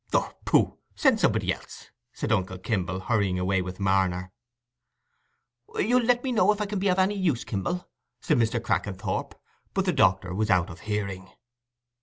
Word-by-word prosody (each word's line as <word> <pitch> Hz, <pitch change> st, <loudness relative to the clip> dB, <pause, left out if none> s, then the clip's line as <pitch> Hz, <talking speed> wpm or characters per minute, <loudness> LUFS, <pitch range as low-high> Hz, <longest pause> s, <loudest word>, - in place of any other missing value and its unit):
"Oh, -, -, +1 dB
pooh—send -, -, +2 dB
somebody -, -, +2 dB
else," -, -, -12 dB, 0.2 s
said -, -, -3 dB
uncle 95 Hz, 0 st, 0 dB
Kimble, 95 Hz, -2 st, -2 dB
hurrying 100 Hz, -4 st, +1 dB
away 95 Hz, +1 st, +1 dB
with 90 Hz, +1 st, -6 dB
Marner. 95 Hz, -2 st, +1 dB, 1.4 s
"You'll 245 Hz, +4 st, +3 dB
let 245 Hz, 0 st, +3 dB
me 265 Hz, -, -1 dB
know 220 Hz, -3 st, +4 dB
if 210 Hz, -, -2 dB
I 210 Hz, -, 0 dB
can 200 Hz, -1 st, -3 dB
be 200 Hz, -, 0 dB
of 180 Hz, -1 st, +2 dB
any 190 Hz, +2 st, +3 dB
use, 175 Hz, -, 0 dB
Kimble," 175 Hz, -, -3 dB, 0.3 s
said -, -, +1 dB
Mr. 115 Hz, +1 st, +1 dB
Crackenthorp. 100 Hz, -4 st, -2 dB, 0.4 s
But -, -, +1 dB
the -, -, +1 dB
doctor 95 Hz, -1 st, +2 dB
was 110 Hz, +3 st, -1 dB
out 90 Hz, -1 st, +2 dB
of 80 Hz, -, -11 dB
hearing. 100 Hz, -3 st, -4 dB
100 Hz, 165 wpm, -26 LUFS, -, 1.4 s, know